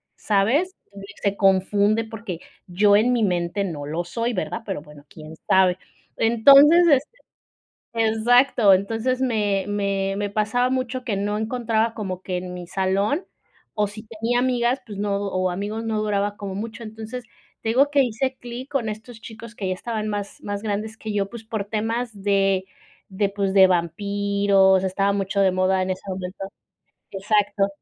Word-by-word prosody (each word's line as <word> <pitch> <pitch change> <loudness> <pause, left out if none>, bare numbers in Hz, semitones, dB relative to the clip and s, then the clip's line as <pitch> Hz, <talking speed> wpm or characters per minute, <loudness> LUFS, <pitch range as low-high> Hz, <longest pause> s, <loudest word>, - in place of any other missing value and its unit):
¿sabes? 250 - +1 0.2
Entonces 200 +1 -11
se 200 0 0
confunde, 200 +3 +3
porque 220 -6 -7 0.3
yo 205 +3 +4
en 240 +4 +3
mi 235 -3 +1
mente 180 +1 0
no 155 -7 -5
lo 160 +4 -3
soy, 230 +7 -2
¿verdad?, 225 +3 -3
pero, 195 -7 -4
bueno, 150 -1 -15
quién 155 0 -11
sabe. 190 -2 +4 0.4
Entonces 275 +9 +7
este, 290 - +2 0.8
exacto. 225 -1 +4
Entonces 225 +6 -1
me 210 -6 0
me 200 -1 -1
me 205 - -1
pasaba 220 +4 +1
mucho 255 0 -2
que 220 -5 -2
no 205 +1 -1
encontraba 225 0 0
como 185 -4 -5
que 185 -1 -3
en 180 0 -5
mi 180 -1 -7
salón, 195 - 0 0.5
o 210 -1 +1
si 210 +2 -9
tenía 230 +2 -1
amigas, 250 0 +1
pues 205 -2 -8
no, 205 -1 0
o 185 -2 -1
amigos 205 +5 -4
no 220 -1 -1
duraba 205 -1 -1
como 195 -2 -6
mucho. 225 +3 -6
Entonces, 225 +2 -7 0.4
te 225 - -1
digo 275 +5 +3
que 285 -1 +4
hice 260 +2 -2
clic 245 +3 -8
con 255 -6 -1
estos 220 +2 -10
chicos 230 0 -10
que 195 -4 -4
ya 185 - 0
estaban 215 +2 -4
más 205 -1 -5
más 205 0 -4
grandes 215 +1 -3
que 220 - -6
yo, 200 -1 -1
pues, 235 -2 -9
por 220 -2 -3
temas 225 +1 -3
de 195 -1 +2 0.4
de 200 0 0
pues, 200 -1 -2
de 190 -1 +8
vampiros, 195 +2 +2
estaba 195 +1 +1
mucho 200 0 -1
de 195 -1 +4
moda 185 +1 +1
en 185 - -2
ese 185 0 -4
momento, 185 0 -5 0.7
exacto 205 0 +1
205 Hz, 170 wpm, -23 LUFS, 195-230 Hz, 0.8 s, de